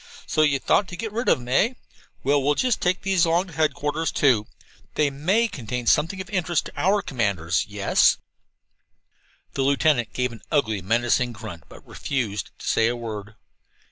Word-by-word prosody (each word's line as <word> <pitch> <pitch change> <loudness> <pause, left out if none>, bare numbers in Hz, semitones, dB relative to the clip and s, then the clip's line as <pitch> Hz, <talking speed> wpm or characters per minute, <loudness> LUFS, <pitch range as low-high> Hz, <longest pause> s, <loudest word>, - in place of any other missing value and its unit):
"So 155 - +1
you 145 -2 +3
thought 185 +8 +2
to 175 - -7
get 220 +4 -5
rid 235 +4 -1
of - - +5
them, 120 -1 -10
eh? 215 - +3 0.5
Well, 140 +1 +3
we'll 145 +2 +2
just 250 - +1
take 180 +1 0
these 190 -3 +2
along 170 +2 +2
to - - -13
headquarters, 155 0 0
too. 120 -7 +2 0.5
They 150 -2 +2
may 190 +12 +1
contain 125 - -5
something 165 - +2
of 190 - -6
interest 175 -4 0
to - - -9
our 195 +2 +2
commanders. 100 -9 -1
Yes?" 100 -1 +3 1.4
The 135 - -2
lieutenant 135 -3 +2
gave 125 -1 -1
an 115 - -11
ugly, 110 -9 +1
menacing 120 +4 +1
grunt, 100 - -9
but - - -14
refused 110 - -3
to - - -9
say 115 - +3
a 120 - 0
word. 110 -3 -7
140 Hz, 175 wpm, -24 LUFS, 115-170 Hz, 1.4 s, of